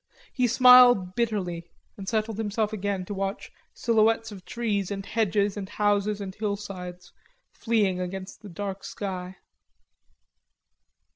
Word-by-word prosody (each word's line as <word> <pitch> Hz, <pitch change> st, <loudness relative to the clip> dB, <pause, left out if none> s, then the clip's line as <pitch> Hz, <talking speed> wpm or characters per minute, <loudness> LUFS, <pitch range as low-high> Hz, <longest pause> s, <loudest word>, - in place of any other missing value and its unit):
He 250 Hz, -1 st, +2 dB
smiled 245 Hz, -6 st, +7 dB
bitterly 185 Hz, -7 st, -2 dB, 0.3 s
and 195 Hz, -1 st, -6 dB
settled 220 Hz, -1 st, -1 dB
himself 215 Hz, 0 st, -1 dB
again 200 Hz, -2 st, -2 dB
to 205 Hz, -, -5 dB
watch 195 Hz, 0 st, -4 dB, 0.2 s
silhouettes 225 Hz, -1 st, +2 dB
of 195 Hz, -3 st, -10 dB
trees 210 Hz, -5 st, -2 dB
and 195 Hz, -1 st, -5 dB
hedges 205 Hz, -2 st, 0 dB
and 195 Hz, -2 st, -6 dB
houses 205 Hz, 0 st, +1 dB
and 195 Hz, -2 st, -6 dB
hillsides 195 Hz, -4 st, -6 dB, 0.4 s
fleeing 205 Hz, -6 st, 0 dB
against 185 Hz, +1 st, -6 dB
the 205 Hz, -, -10 dB
dark 195 Hz, +2 st, -5 dB
sky. 185 Hz, -2 st, -5 dB
205 Hz, 125 wpm, -26 LUFS, 190-220 Hz, 0.4 s, smiled